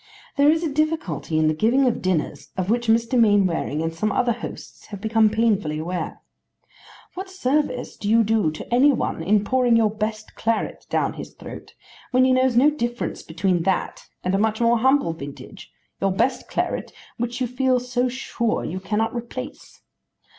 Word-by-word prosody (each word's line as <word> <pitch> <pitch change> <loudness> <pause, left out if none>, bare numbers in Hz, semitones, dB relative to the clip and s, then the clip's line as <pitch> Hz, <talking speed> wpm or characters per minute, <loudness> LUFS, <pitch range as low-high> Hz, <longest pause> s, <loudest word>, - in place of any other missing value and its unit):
There 285 +1 +5
is 320 +2 +2
a 310 -4 -2
difficulty 305 - -1
in 155 0 +3
the 155 - +2
giving 235 - +3
of 245 - 0
dinners 185 -5 -2
of 185 +2 0
which 240 0 0
Mr. 230 +2 +3
Mainwaring 190 -8 +2
and 165 0 -2
some 215 +6 -1
other 245 +2 +2
hosts 230 0 -8
have 200 -2 -8
become 220 +1 +3
painfully 210 -8 +1
aware. 165 +1 -4 0.9
What 380 +1 -6
service 295 -7 -1
do 205 - -3
you 230 +1 +5
do 215 -5 +2
to 155 +9 -7
any 270 +4 +6
one 240 - -2
in 200 +4 +2
pouring 245 +1 +3
your 220 -2 +3
best 215 0 -4
claret 225 0 -2
down - - 0
his - - -9
throat, - - -10 0.3
when 255 0 +4
he 260 - +4
knows 255 -1 +2
no 280 +5 +6
difference 240 -4 -3
between 175 +2 0
that 185 +2 -2 0.2
and 185 - 0
a 195 - +2
much 220 0 +1
more 235 0 +3
humble 265 - +3
vintage, 140 -3 -10 0.3
your 195 - +2
best 250 +7 0
claret - - -2 0.3
which 240 +1 -3
you 255 - +1
feel 255 +1 +1
so 250 0 -1
sure 240 -2 -2
you 185 - -4
cannot 210 +5 -1
replace? 255 +3 -7
225 Hz, 180 wpm, -23 LUFS, 195-255 Hz, 0.9 s, any